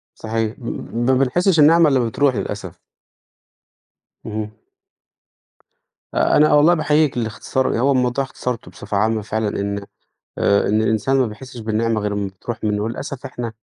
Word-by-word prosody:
صحيح 110 0 -2
م 120 - -11 0.3
م 120 +1 -1
ما 130 - +4
بنحسّش 160 +7 +2
النعمة 160 +2 +6
إلّا 135 - +3
لمّا 120 - +1
بتروح 135 +2 +1
للأسف. - - -5 1.5
اهم. 105 -1 -4 1.6
آآ، - - +3
أنا 150 +1 +5
والله 150 +4 +6
باحيّيك 155 -4 +2
للإختصار، 115 +2 -1
هو 135 +3 +3
الموضوع 125 +1 +1
اختصرته 125 -3 -5
بصفة 100 0 -4
عامة 110 +1 +1
فعلًا 110 0 -2
إن 100 0 -3 0.5
آآ، 100 0 +2
إن 110 +1 +2
الإنسان 110 +4 +1
ما 130 -3 +2
بيحسّش 120 +4 -10
بالنعمة 110 0 0
غير 105 0 -2
لمّا 100 -1 -2
بتروح 110 +5 -7
مِنّه، 105 -1 0
وللأسف 125 +4 -5
إحنا 120 -2 -5
115 Hz, 155 wpm, -20 LUFS, 110-135 Hz, 1.6 s, النعمة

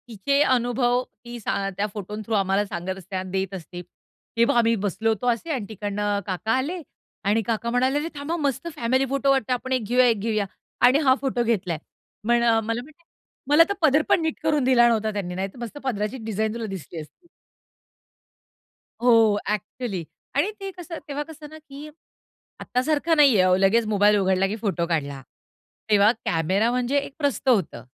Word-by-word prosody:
तिचे 260 +6 0
अनुभव 245 -1 +1 0.2
ती 240 0 -7
सां 200 -2 -2
त्या 200 - +1
फोटों 210 0 -6
थ्रू 225 - -3
आम्हाला 195 +1 +1
सांगत 185 0 -5
असते 190 +1 -9
आणि 185 0 -3
देत 190 0 -2
असते. 175 -1 -8 0.6
हे 230 - +5
बघ - - +2
आम्ही 230 -1 +4
बसलो 205 +3 0
होतो 220 +2 -1
असे 240 +7 0
आणि 255 -8 -2
तिकडनं 205 0 -2
काका 195 +4 -2
आले 330 +7 -3 0.5
आणि 220 +2 +3
काका 230 0 -1
म्हणाले, 255 +3 +1
"अरे 305 - -3
थांबा 290 +4 -3
मस्त 280 0 -2
फॅमिली 260 0 +1
फोटो 275 0 0
वाटतं, 265 -2 +1
आपण 255 +1 -4
एक 255 -3 0
घेऊया, 250 +4 +3
एक 225 -3 +2
घेऊया." 215 -1 0 0.4
आणि 255 +4 +5
हा 260 - +6
फोटो 260 -3 0
घेतलाय. 195 -8 0 0.5
पण 240 0 +3
मला 230 0 +1
म्हणे, 310 +5 -17 0.5
"मला 300 +3 +7
तर - - +1
पदर 305 -1 +4
पण 355 - +4
नीट 320 -1 -2
करून 305 -3 +2
दिला 250 -2 +5
नव्हता 220 -2 +1
त्यांनी, 180 -3 -4
नाहीतर 190 +4 -4
मस्त 240 +4 -7
पदराची 225 -1 -2
डिझाइन 220 0 -1
तुला 230 -1 -4
दिसली 170 -1 -8
असती." 345 - -17 1.7
हो. 225 -4 +5
ॲक्चुअली 210 -1 -3 0.3
आणि 420 - +2
ते 390 0 -5
कसं 345 -1 -7
तेव्हा 290 0 -3
कसं 305 -1 -11
ना, 310 - -11
की 295 -1 -11 0.7
आत्तासारखं 305 +5 0
नाहीये 275 -10 +6
हो, 185 0 +4
लगेच 195 +5 +3
मोबाईल 210 0 +4
उघडला 190 0 +2
की 210 - -3
फोटो 190 -7 -1
काढला. 145 -5 -2 0.7
तेव्हा 205 0 +6
कॅमेरा 185 +8 +1
म्हणजे 250 +3 0
एक 280 -1 -4
प्रस्थ 280 -3 -1
होतं. 205 - +1
230 Hz, 180 wpm, -24 LUFS, 200-270 Hz, 1.7 s, मला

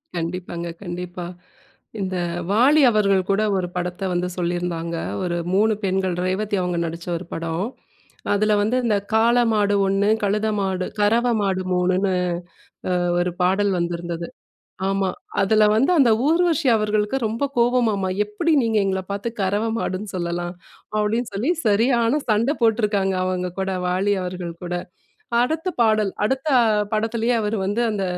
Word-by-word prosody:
கண்டிப்பாங்க, 170 0 -4 0.2
கண்டிப்பா. 180 0 -6 0.7
இந்த 190 -1 -2 0.4
வாலி 275 +8 +5
அவர்கள் 200 -3 +3
கூட 195 +2 +2
ஒரு 180 -1 -1
படத்த 180 +1 -3
வந்து 175 +1 0
சொல்லியிருந்தாங்க. 175 -1 -2 0.3
ஒரு 175 -1 -1 0.2
3 215 +3 +3
பெண்கள், 190 -2 0
ரேவதி 200 +3 -1
அவங்க 180 -1 -1
நடிச்ச 165 +1 -6
ஒரு 180 - -8
படம். 165 +3 -2 0.7
அதில 215 +1 +2
வந்து 220 +5 +1
இந்த 215 -3 +2 0.2
காள 230 +2 +4 0.2
மாடு 205 -1 +2
ஒண்ணு, 195 +2 +2
கழுத 210 +2 +1
மாடு, 190 -2 -1 0.2
கறவை 235 +4 +3
மாடு 190 -2 0
3 - - +2
மூணுன்னு 185 +1 +1 1.0
ஒரு 175 0 0
பாடல் 195 +3 +2
வந்திருந்தது. 170 0 -3 0.6
ஆமா. 195 -1 0 0.3
அதில 215 +2 +4
வந்து 260 +10 +3
அந்த 260 -6 +5 0.2
ஊர்வசி 330 -2 +2
அவர்களுக்கு 215 +2 0
ரொம்ப 225 +5 -2
கோவமாம்மா.எப்டி 210 - +1
நீங்க 225 -2 +1
எங்கள 190 -1 0
பார்த்து 200 +4 -3
கறவை 205 +4 0
மாடுன்னு 200 -1 -3
சொல்லலாம். 175 0 -3 0.4
அப்டின்னு 220 +3 0
சொல்லி 215 +10 -1 0.2
சரியான 235 +5 +3
சண்டை 230 +7 +2
போட்டிருக்காங்க. 210 -4 +2
அவங்க 180 -1 -1
கூட 190 0 -1 0.2
வாலி 190 +3 +1
அவர்கள் 180 -1 -5
கூட. 175 0 -4 0.7
அடுத்த 315 +8 0
பாடல், 215 -3 +3
அடுத்த 265 +6 -1 0.5
படத்திலேயே 225 +2 0
அவர் 210 +1 -1
வந்து 205 +4 0
அந்த 205 -2 -2
200 Hz, 135 wpm, -22 LUFS, 180-220 Hz, 1.0 s, வாலி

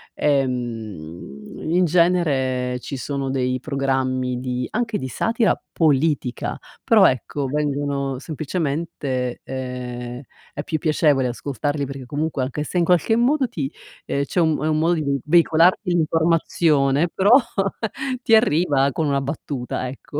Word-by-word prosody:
ehm, 115 - -3
in 180 +2 +3
genere 140 -8 +1
ci 135 +2 -6
sono 135 +1 -3
dei 130 -1 0
programmi 130 -2 -1
di 125 -1 -3
anche 230 -3 -1
di 130 - -4
satira 225 - +1 0.2
politica, 150 -4 +1 0.3
però 215 -4 +6
ecco, 130 +3 0
vengono 140 -1 -1
semplicemente 145 -5 -3
ehm, 125 -1 -6 0.3
è 145 - -4
più 155 +1 -2
piacevole 150 -4 +2
ascoltarli 140 +3 -2
perché 135 -1 -7
comunque 150 +1 -2
anche 140 +3 -3
se 175 +4 -2
in 170 - +3
qualche 180 +5 +3
modo 260 +4 +2
ti 140 - -4 0.3
ehm 140 - -1
c'è 140 - -2
un 160 -3 +2
è 155 - +1
un 155 -1 +1
modo 165 +2 +3
di 140 -4 -1
veicolarti 170 +4 +4
l'informazione, 160 -2 +2
però 195 +2 +3 0.9
ti 225 - +5
arriva 150 - +3
con 155 +3 -1
una 140 -1 +1
battuta 135 -3 -4
ecco, 140 +3 -7
140 Hz, 135 wpm, -22 LUFS, 130-165 Hz, 0.9 s, però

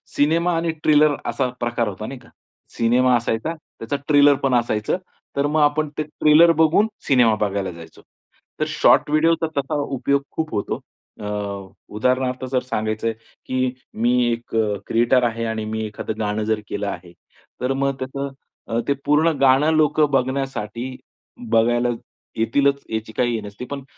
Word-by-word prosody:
Cinema 165 +4 +2
आणि 165 0 0
trailer 150 -1 +5
असा 130 -2 -1
प्रकार 120 -1 -1
होता, 105 +1 -5
नाही 135 +3 -7
का? 120 - -19 0.5
सिनेमा 125 +2 +3
असायचा 115 +6 -1
त्याचा 145 -4 -7
ट्रेलर 145 -1 +6
पण 135 - +2
असायचं. 110 +3 -1 0.4
तर 140 - +1
मग 155 +2 +1
आपण 150 +1 +2
ते 155 - 0
ट्रेलर 155 +2 +5
बघून 165 +7 +4 0.2
सिनेमा 120 -5 +4
बघायला 100 -2 -1
जायचो. 85 -1 -13 0.6
तर - - +1
शॉर्ट - - +4
व्हिडिओचा 165 +2 +2
तसा 140 +2 -1
उपयोग 140 0 0
खूप 160 -1 -3
होतो. 100 - -2 0.4
अ, 105 - -7 0.7
उदाहरणार्थ 130 +3 0
जर 130 - +2
सांगायचंय 110 -2 -2 0.3
की 130 0 0 0.3
मी 120 +1 +3 0.2
१ 115 0 -5 0.3
क्रिएटर 120 +2 +3
आहे 115 -1 -1
आणि 110 -1 -3
मी 110 0 -3
एखादं 110 +1 -5
गाणं 105 0 -1
जर 110 0 0
केलं 100 0 -3
आहे. 90 -2 -6 0.5
तर 125 +2 0
मग 140 0 0
कसं 140 +2 -4 0.4
अ, 115 - 0
ते 140 - +3
पूर्ण 150 +3 +4
गाणं 135 +3 +4
लोकं 155 -1 +3
बघण्यासाठी 130 -2 -2 0.5
बघायला 120 +2 +3 0.5
येतीलच 140 +5 +2
याची 110 0 -3
काही 120 -1 +1
हे 110 - -3
नसती. 105 +4 -8
पण 140 +1 -6
130 Hz, 155 wpm, -21 LUFS, 110-145 Hz, 0.7 s, ट्रेलर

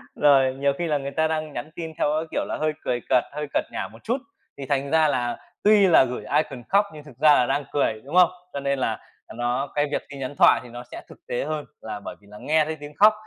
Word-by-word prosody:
Rồi, 135 -3 +4
nhiều 140 +1 +1
khi 175 - -2
là 150 -2 +1
người 140 0 -5
ta 160 +3 +1
đang 155 -1 -3
nhắn 150 - -5
tin 160 -1 -6
theo - - +2
cái, 160 - -2
kiểu, - - -1
là - - -4
hơi 155 0 +1
cười 125 -1 -1
cợt, 125 -2 +4
hơi 150 0 -4
cợt - - +2
nhả - - -3
một - - -16
chút, 235 +3 0 0.4
thì 140 - -6
thành 140 0 -1
ra 160 -1 +4
là 120 -4 -1 0.3
tuy 205 -1 +6
là 165 -6 +7
gửi 125 -4 -4
icon 135 -5 -2
khóc 200 +1 +4
nhưng 150 -1 -10
thực 145 -5 -15
ra 150 +1 +6
là 125 - +4
đang 140 +2 0
cười, 110 -6 0
đúng 145 +5 -6
không? 180 -1 +7 0.2
Cho 140 - -3
nên 140 0 -1
là - - -1 0.3
là - - -11
nó 120 +3 -1
cái 145 0 +2
việc - - -1
tin 140 -1 -9
nhắn 135 +2 -5
thoại - - +6
thì 125 - -12
nó 120 +1 -8
sẽ - - -7
thực - - -13
tế 120 - -2
hơn 155 -1 -3 0.2
là 110 -2 -6
bởi - - -8
vì 100 - -21
là 105 - -10
nghe 155 0 +2
thấy 160 +1 -4
tiếng 145 0 -9
khóc, 215 +1 +7
145 Hz, 280 wpm, -24 LUFS, 130-155 Hz, 0.4 s, là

